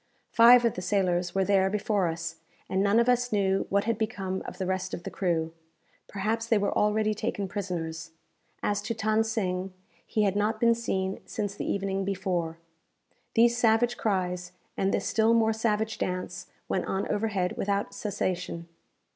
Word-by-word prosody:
Five 240 +1 +7
of 230 - +2
the 180 - -5
sailors 180 -2 0
were 195 -1 +2
there 190 -1 +3
before 205 -2 0
us, 165 0 -4 0.3
and 190 - 0
none 200 +2 +3
of 235 - +3
us 245 0 +2
knew 195 -2 +1
what 200 0 +2
had 230 -1 -1
become 195 -4 -2
of - - -7
the 190 - -2
rest 185 0 -2
of 175 - -10
the - - -6
crew 165 -3 -1 0.5
perhaps 220 +3 -2
they 230 - +4
were 205 0 0
already 215 +1 +2
taken 210 -2 -3
prisoners. 165 -4 -4 0.5
As 205 -1 0
to 225 +2 -3
Than 220 0 +2
Sing, 190 -4 -2 0.3
he 215 - 0
had 200 -1 +1
not 215 +2 0
been 235 0 +5
seen 190 -5 -2
since 205 -2 -3
the - - -3
evening 195 0 -1
before. 180 -4 -2 0.8
These 235 +1 +5
savage 240 +1 +3
cries, 180 -4 -2 0.2
and 195 0 +1
this - - -1
still 225 +1 +3
more 225 -1 +3
savage 220 0 -1
dance, 180 -1 -3 0.2
went 185 - -1
on 195 +1 -2
overhead 205 -4 -1
without 200 0 -1
cessation. 180 -4 -3
200 Hz, 170 wpm, -28 LUFS, 185-220 Hz, 0.8 s, Five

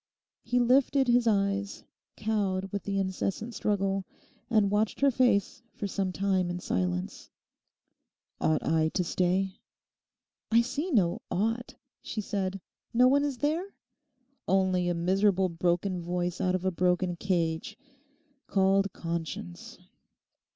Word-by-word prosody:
He 245 +1 0
lifted 265 +2 +3
his 240 0 +3
eyes, 200 -1 0 0.3
cowed 195 -3 -1
with 200 - -4
the 200 -1 -1
incessant 195 +4 -2
struggle, 195 -1 0 0.5
and 215 -4 +3
watched 210 +4 0
her 280 -1 +5
face 240 -5 +2
for - - -4
some 195 -1 -1
time 190 -1 0
in 175 0 -3
silence. 90 - -2 1.1
'Ought 155 -1 +1
I 160 0 +2
to 180 - +2
stay?' 185 +2 0 0.9
'I 230 +1 +6
see 280 +9 -3
no 195 - +2
"ought,"' 225 +5 -1 0.3
she - - -5
said. 195 -2 -2 0.4
'No 250 +1 +6
one 280 +2 +4
is 285 -3 -2
there?' 325 +9 -1 0.7
'Only 185 -1 +2
a 175 - 0
miserable 190 +2 +2
broken 175 +2 0
voice 175 +1 -2
out 185 0 +1
of 185 0 -3
a 190 - +2
broken 180 0 +1
cage—called 200 - -2
Conscience. 165 - -5
195 Hz, 125 wpm, -29 LUFS, 180-230 Hz, 1.1 s, I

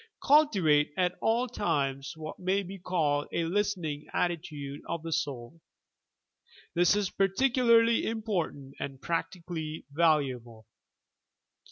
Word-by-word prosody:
5. - - -9
Cultivate 190 - +4
at 180 -1 +2
all 235 +3 +2
times 140 - -1
what 155 -1 -7
may 190 +2 0
be 195 +1 -8
called 155 -5 0
a 170 - 0
listening 170 -5 -1
attitude 150 -5 -2
of 170 -1 -3
the 165 - -5
soul. 140 +3 -4 1.1
This 175 +3 +4
is 205 -3 0
particularly 230 +3 +3
important 185 - -3
and 135 -2 -5
practically 165 -2 -4
valuable. 130 -8 +1
170 Hz, 115 wpm, -29 LUFS, 145-200 Hz, 1.1 s, Cultivate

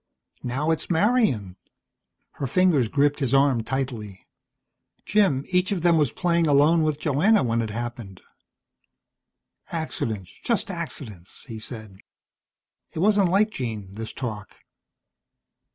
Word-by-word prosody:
Now 135 +6 -1
it's 160 - -2
Marian." 165 - +1 0.7
Her 140 - -4
fingers 165 -5 +3
gripped 145 +5 +1
his 135 -2 +1
arm 135 -3 +3
tightly. 115 -6 -4 0.8
"Jim, 190 -11 +2
each 180 +1 +1
of 180 -5 -1
them 170 -1 +5
was 145 -6 +2
playing 170 -2 +1
alone 150 +3 +4
with 155 -2 0
Joanna 160 +10 +3
when 115 -1 0
it 110 - -3
happened." 115 -4 -6 1.5
"Accidents, 110 - -4
just 230 -4 0
accidents," 125 - -8
he 115 -2 -7
said. 110 -4 -9 0.9
It - - -9
wasn't 200 +1 +3
like 210 +4 +3
Jean, 110 - -5
this 110 +1 -6
talk. 110 -6 -6
140 Hz, 120 wpm, -24 LUFS, 115-170 Hz, 1.5 s, them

